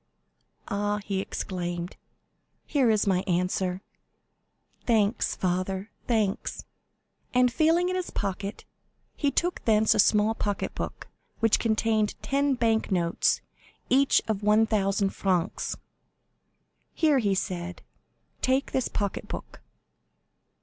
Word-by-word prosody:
"Ah," 205 Hz, -1 st, -1 dB
he 195 Hz, -1 st, -1 dB
exclaimed, 175 Hz, -2 st, -4 dB, 0.7 s
"here 270 Hz, -5 st, +2 dB
is 215 Hz, -1 st, +3 dB
my 190 Hz, -3 st, +2 dB
answer. 180 Hz, +1 st, 0 dB, 1.0 s
Thanks, 220 Hz, -1 st, +2 dB
father, 185 Hz, +2 st, -2 dB, 0.2 s
thanks." 215 Hz, -5 st, -1 dB, 0.7 s
And 250 Hz, -1 st, +4 dB
feeling 325 Hz, +6 st, +3 dB
in 365 Hz, -, -1 dB
his 365 Hz, -1 st, -2 dB
pocket, 200 Hz, +1 st, -4 dB, 0.5 s
he 290 Hz, -, +1 dB
took 350 Hz, +5 st, -1 dB
thence 215 Hz, -1 st, +4 dB
a -, -, -1 dB
small 210 Hz, +2 st, +4 dB
pocket 205 Hz, -3 st, -2 dB
book, -, -, -6 dB, 0.3 s
which 225 Hz, -1 st, +3 dB
contained 220 Hz, -1 st, +1 dB
ten 280 Hz, 0 st, +1 dB
bank 225 Hz, -2 st, +1 dB
notes, 170 Hz, -2 st, +1 dB, 0.5 s
each 275 Hz, +2 st, +4 dB
of 215 Hz, -2 st, -1 dB
1,000 210 Hz, -2 st, +2 dB
francs. 185 Hz, -1 st, -1 dB, 1.2 s
"Here," 305 Hz, -4 st, +3 dB
he 200 Hz, -4 st, +1 dB
said, 180 Hz, -1 st, -4 dB, 0.6 s
"take 260 Hz, +2 st, +1 dB
this 260 Hz, -, 0 dB
pocket 200 Hz, -2 st, -3 dB
book." -, -, -8 dB
210 Hz, 110 wpm, -27 LUFS, 190-240 Hz, 1.2 s, And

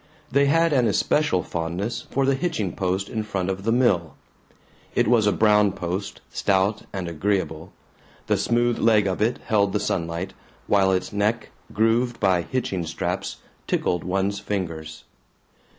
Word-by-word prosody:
They 140 Hz, +2 st, +4 dB
had 165 Hz, +2 st, +3 dB
an 125 Hz, -4 st, +3 dB
especial 130 Hz, -1 st, +1 dB
fondness 90 Hz, +8 st, -3 dB
for 135 Hz, 0 st, +1 dB
the 135 Hz, -, +3 dB
hitching 135 Hz, -, -2 dB
post 95 Hz, +1 st, -1 dB
in 110 Hz, -, -3 dB
front 95 Hz, -3 st, -2 dB
of 95 Hz, +1 st, -6 dB
the 115 Hz, -, +2 dB
mill. 100 Hz, -, +2 dB, 0.8 s
It -, -, +3 dB
was 110 Hz, -3 st, +4 dB
a -, -, +4 dB
brown 105 Hz, -2 st, +4 dB
post, 90 Hz, +2 st, -4 dB
stout 100 Hz, +1 st, +1 dB
and 95 Hz, -3 st, -4 dB
agreeable; 85 Hz, -1 st, -2 dB, 0.5 s
the -, -, +2 dB
smooth 120 Hz, 0 st, +1 dB
leg 110 Hz, -3 st, +4 dB
of 95 Hz, +1 st, -1 dB
it 115 Hz, +3 st, +2 dB
held 100 Hz, -2 st, +2 dB
the 105 Hz, -, +1 dB
sunlight, 85 Hz, 0 st, -2 dB, 0.3 s
while 95 Hz, -2 st, +3 dB
its 95 Hz, +1 st, -1 dB
neck, 105 Hz, +3 st, 0 dB, 0.2 s
grooved 115 Hz, +3 st, +1 dB
by 95 Hz, -3 st, +3 dB
hitching 95 Hz, -4 st, -2 dB
straps, 80 Hz, -, -3 dB, 0.3 s
tickled 90 Hz, -, 0 dB
one's 95 Hz, +2 st, -1 dB
fingers. 85 Hz, -6 st, -4 dB
100 Hz, 150 wpm, -24 LUFS, 90-115 Hz, 0.8 s, They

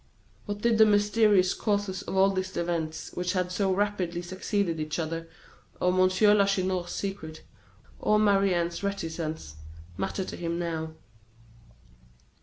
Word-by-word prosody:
What 205 Hz, 0 st, -4 dB
did 230 Hz, -1 st, +2 dB
the 220 Hz, -, +9 dB
mysterious 205 Hz, -2 st, +4 dB
causes 200 Hz, -3 st, -1 dB
of 190 Hz, -, -4 dB
all 195 Hz, +1 st, +5 dB
these 190 Hz, 0 st, -3 dB
events 165 Hz, -2 st, -2 dB
which 180 Hz, +1 st, -2 dB
had 180 Hz, -1 st, -1 dB
so 190 Hz, +1 st, +1 dB
rapidly 185 Hz, -3 st, -1 dB
succeeded 185 Hz, -1 st, -2 dB
each 155 Hz, 0 st, -3 dB
other, 165 Hz, 0 st, -4 dB, 0.5 s
or 180 Hz, -, +2 dB
M. 185 Hz, 0 st, +4 dB, 0.3 s
Lacheneur's 185 Hz, -3 st, +1 dB
secrets, 195 Hz, -6 st, -5 dB, 0.6 s
or 210 Hz, -, +3 dB
Marie 200 Hz, -2 st, +3 dB
Anne's 170 Hz, +1 st, -1 dB
reticence, 160 Hz, -, -4 dB, 0.4 s
matter 190 Hz, -, -2 dB
to -, -, -6 dB
him 170 Hz, -1 st, -3 dB
now? 160 Hz, -2 st, -3 dB
185 Hz, 135 wpm, -27 LUFS, 170-200 Hz, 0.6 s, the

